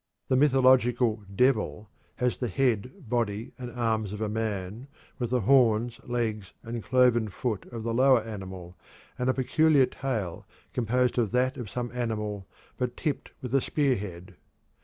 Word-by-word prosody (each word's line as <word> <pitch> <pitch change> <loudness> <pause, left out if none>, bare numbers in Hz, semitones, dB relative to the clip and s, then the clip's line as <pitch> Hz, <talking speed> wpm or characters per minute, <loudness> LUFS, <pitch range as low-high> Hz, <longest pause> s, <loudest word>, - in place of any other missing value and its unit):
The 130 - +3
mythological 130 -5 +4
"devil" 110 -3 +1 0.2
has 125 -2 -1
the 125 - -1
head, 125 +2 -1
body, 115 -2 -1
and 125 -1 -5
arms 110 -4 -1
of 105 - -6
a 110 - -1
man, 105 +1 -3 0.3
with 120 -2 -1
the 125 0 +1
horns, 120 -1 +3
legs, 110 -5 -2
and 115 0 -5
cloven 125 -2 +3
foot 105 +1 -3
of 115 -2 -7
the 115 0 -1
lower 130 0 +5
animal, 95 -5 -8 0.4
and 125 +1 +1
a - - +4
peculiar 145 +1 +4
tail 120 -9 -4 0.3
composed 125 +1 +1
of 115 -4 +1
that 130 +1 +2
of 120 -7 -6
some 120 +2 -4
animal 105 -5 -3 0.3
but 125 -1 -2
tipped 150 - -2
with 125 -1 -5
a 135 - +4
spearhead. 105 - -1
120 Hz, 155 wpm, -28 LUFS, 105-125 Hz, 0.4 s, lower